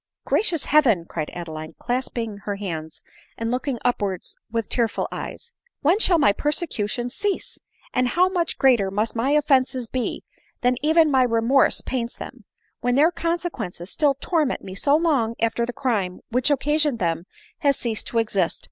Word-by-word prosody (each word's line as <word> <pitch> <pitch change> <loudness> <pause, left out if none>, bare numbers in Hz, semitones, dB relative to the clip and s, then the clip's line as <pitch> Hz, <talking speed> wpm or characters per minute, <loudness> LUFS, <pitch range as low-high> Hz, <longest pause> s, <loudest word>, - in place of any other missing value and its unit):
" - - -61
Gracious 355 -8 +1
Heaven 240 - +4
!" - - -27
cried 155 -2 -4
Adeline, 155 -2 -7
clasping 240 -3 -3
her 205 - -2
hands 160 -6 -6 0.3
and 230 0 -2
looking 255 +1 -1
upwards 200 -7 -1 0.2
with 230 -2 -1
tearful 235 -3 0
eyes, - - -6 0.2
" - - -49
when 340 +8 +4
shall 360 -5 +4
my 205 -10 +4
persecutions 245 - -2
cease! 410 -1 -2 0.3
and 250 -1 +2
how 355 +9 +3
much 355 -3 -1
greater 240 -8 +4
must 210 +4 -1
my 235 +4 0
offences 265 -4 +2
be 250 +2 -3 0.4
than 245 +1 +3
even 315 +1 +4
my 265 -1 +4
remorse 240 +2 +3
paints 240 -2 -3
them, - - -10 0.3
when 245 0 +1
their 305 +5 +5
consequences 330 - -3
still 290 -3 +2
torment 310 -6 0
me 190 - -7
so 280 +9 +2
long 280 -9 +1
after 230 +1 0
the - - -2
crime 210 -9 -1
which 250 +4 +2
occasioned 295 -1 +2
them 170 -3 -1 0.3
has 280 -4 +2
ceased 225 -3 -3
to 235 - -3
exist 205 -6 +1
245 Hz, 170 wpm, -23 LUFS, 215-295 Hz, 0.4 s, their